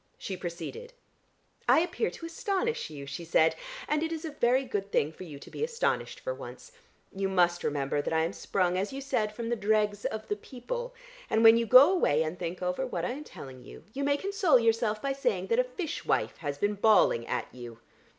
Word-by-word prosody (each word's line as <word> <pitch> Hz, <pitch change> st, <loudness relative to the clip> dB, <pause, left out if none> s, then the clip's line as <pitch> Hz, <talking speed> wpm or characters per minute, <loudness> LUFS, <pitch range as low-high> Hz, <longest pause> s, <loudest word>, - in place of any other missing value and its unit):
She 190 Hz, -, -5 dB
proceeded: 180 Hz, -, -7 dB, 0.8 s
"I -, -, +6 dB
appear 360 Hz, +6 st, -1 dB
to 330 Hz, -, -9 dB
astonish 395 Hz, -, -2 dB
you," 145 Hz, -2 st, -8 dB
she 140 Hz, +5 st, -6 dB
said, 160 Hz, -1 st, +3 dB, 0.3 s
"and 300 Hz, 0 st, +1 dB
it 325 Hz, 0 st, -1 dB
is 325 Hz, 0 st, -4 dB
a 315 Hz, -, -4 dB
very 260 Hz, -1 st, +2 dB
good 200 Hz, -4 st, -3 dB
thing 150 Hz, -, +1 dB
for 185 Hz, -, -10 dB
you 150 Hz, -4 st, -9 dB
to -, -, -13 dB
be -, -, -4 dB
astonished 475 Hz, +1 st, -1 dB
for -, -, -3 dB
once. 485 Hz, -, -10 dB, 0.4 s
You 195 Hz, 0 st, -1 dB
must 175 Hz, -2 st, +2 dB
remember 145 Hz, 0 st, 0 dB
that -, -, -4 dB
I 160 Hz, 0 st, +2 dB
am 165 Hz, +4 st, -2 dB
sprung, 185 Hz, -2 st, 0 dB
as 195 Hz, -, -2 dB
you 270 Hz, -, -5 dB
said 225 Hz, -6 st, -1 dB
from 230 Hz, +1 st, -5 dB
the 240 Hz, -, +1 dB
dregs 210 Hz, -1 st, +1 dB
of 220 Hz, 0 st, -3 dB
the 205 Hz, -, -1 dB
people, 485 Hz, -, -6 dB, 0.3 s
and 220 Hz, -, +2 dB
when 225 Hz, 0 st, +9 dB
you 230 Hz, 0 st, +1 dB
go 260 Hz, -, +9 dB
away 160 Hz, -, +2 dB
and 160 Hz, +3 st, -5 dB
think 175 Hz, +1 st, -4 dB
over 180 Hz, +8 st, -1 dB
what 255 Hz, -, -3 dB
I -, -, -1 dB
am 285 Hz, +4 st, -6 dB
telling 130 Hz, -2 st, -11 dB
you, -, -, -12 dB
you 280 Hz, -, -3 dB
may 285 Hz, 0 st, +2 dB
console 390 Hz, -5 st, +3 dB
yourself 225 Hz, -2 st, +1 dB
by 275 Hz, 0 st, 0 dB
saying 275 Hz, -, -1 dB
that 465 Hz, +1 st, +3 dB
a -, -, +5 dB
fish 400 Hz, -11 st, -5 dB
wife -, -, 0 dB
has 145 Hz, -2 st, -4 dB
been 205 Hz, +6 st, +1 dB
bawling 205 Hz, -, +4 dB
at -, -, -2 dB
you. 120 Hz, -2 st, -9 dB
220 Hz, 220 wpm, -29 LUFS, -, 0.8 s, when